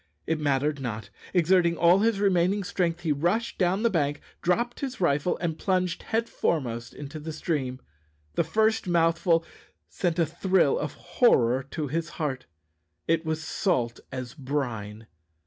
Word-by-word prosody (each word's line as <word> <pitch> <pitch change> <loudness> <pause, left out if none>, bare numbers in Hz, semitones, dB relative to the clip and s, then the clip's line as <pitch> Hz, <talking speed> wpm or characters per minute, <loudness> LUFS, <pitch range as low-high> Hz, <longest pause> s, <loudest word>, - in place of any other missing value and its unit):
It 160 -1 0
mattered 145 0 0
not. 110 -5 -5 0.2
Exerting 175 -1 +3
all 175 +3 +5
his 220 -1 +2
remaining 195 0 +2
strength 175 -3 -1
he 160 - 0
rushed 175 +11 0
down 185 +3 +2
the 235 - +4
bank, 145 -4 0 0.2
dropped 235 +7 0
his 265 -2 -4
rifle, 160 -1 +1
and 165 -3 -3
plunged 185 -2 0
headforemost 135 - -1
into 145 +2 -7
the 160 +2 -6
stream. 145 -5 -2 0.5
The - - +2
first 220 +5 +1
mouthful 165 0 +3 0.4
sent 175 -3 -1
a 170 - +3
thrill 190 - +2
of - - -3
horror 130 - +3
to 155 -3 -3
his 165 +4 -2
heart; 140 -6 -3 0.6
it 165 0 +1
was 160 0 -1
salt 125 - 0
as 130 -2 -5
brine! 120 -7 -4
165 Hz, 145 wpm, -27 LUFS, 140-185 Hz, 0.6 s, all